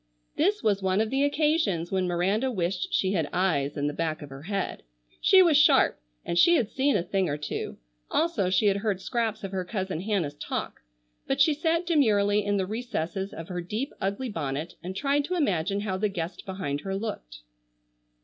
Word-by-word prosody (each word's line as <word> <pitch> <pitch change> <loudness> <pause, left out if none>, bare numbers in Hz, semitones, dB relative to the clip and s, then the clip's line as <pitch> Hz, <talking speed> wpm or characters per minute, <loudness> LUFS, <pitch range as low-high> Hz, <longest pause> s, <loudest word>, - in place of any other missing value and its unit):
This 405 +7 +1
was 200 -2 +2
one 190 +1 +1
of 220 0 0
the 270 +1 +2
occasions 285 - +1
when 190 -1 +1
Miranda 195 +8 +1
wished 195 - -2
she 190 - +1
had 165 -7 0
eyes 150 -7 0
in 145 - -1
the 145 - -1
back 160 -1 -2
of 145 - -10
her 135 0 -9
head. 195 +4 -3 0.4
She 380 -1 +7
was 325 -5 +5
sharp 295 - +5 0.3
and 170 - 0
she 345 - +6
had 230 -9 +1
seen 270 -1 +2
a 175 - -1
thing 190 -1 0
or 145 - -1
two, 145 -1 -5 0.3
also 245 - +1
she 185 +3 +2
had 200 -1 +4
heard 200 -2 -1
scraps 225 +1 -2
of 195 - -4
her 190 -1 -2
cousin 190 -3 -3
Hannah's 190 -8 -1
talk. 145 - -5 0.5
But 270 +1 0
she 295 +3 +5
sat 330 +3 0
demurely 210 -11 +3
in 205 0 0
the 190 - 0
recesses 195 -3 -3
of 165 - -8
her 180 -1 -3
deep, 215 +11 -4
ugly 200 +6 -2
bonnet 150 -3 -3
and 185 +2 -6
tried 285 +4 +1
to 365 +4 -2
imagine 200 - 0
how 190 -3 -2
the 210 +2 0
guest 175 -1 -5
behind 185 -7 -3
her 195 0 -3
looked. - - -5
195 Hz, 200 wpm, -27 LUFS, 175-245 Hz, 0.5 s, She